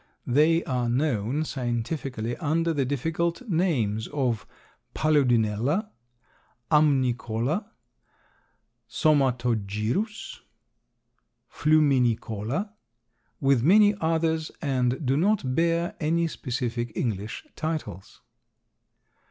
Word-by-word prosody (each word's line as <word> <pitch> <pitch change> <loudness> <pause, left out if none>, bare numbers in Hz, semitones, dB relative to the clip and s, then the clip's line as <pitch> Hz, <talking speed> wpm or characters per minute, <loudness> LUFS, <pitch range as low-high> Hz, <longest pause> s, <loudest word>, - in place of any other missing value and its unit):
They 155 +6 +3
are 125 -3 -1
known 130 +1 0
scientifically 120 -2 -3
under 165 +1 0
the 140 -3 0
difficult 165 - -2
names 135 - 0
of 125 -7 -2 0.5
Paludinella, 135 - +1 0.8
Amnicola, 135 - +1 1.2
Somatogyrus, 125 - 0 1.1
Fluminicola, 135 - +1 0.7
with 135 -5 +3
many 205 - +6
others, 160 -1 0
and 130 0 0
do 130 +2 +2
not 170 -5 +1
bear 170 +2 +1
any 165 +2 +1
specific 120 -5 -3
English 105 -3 -3
titles. 155 - -5
140 Hz, 75 wpm, -26 LUFS, 120-160 Hz, 1.2 s, many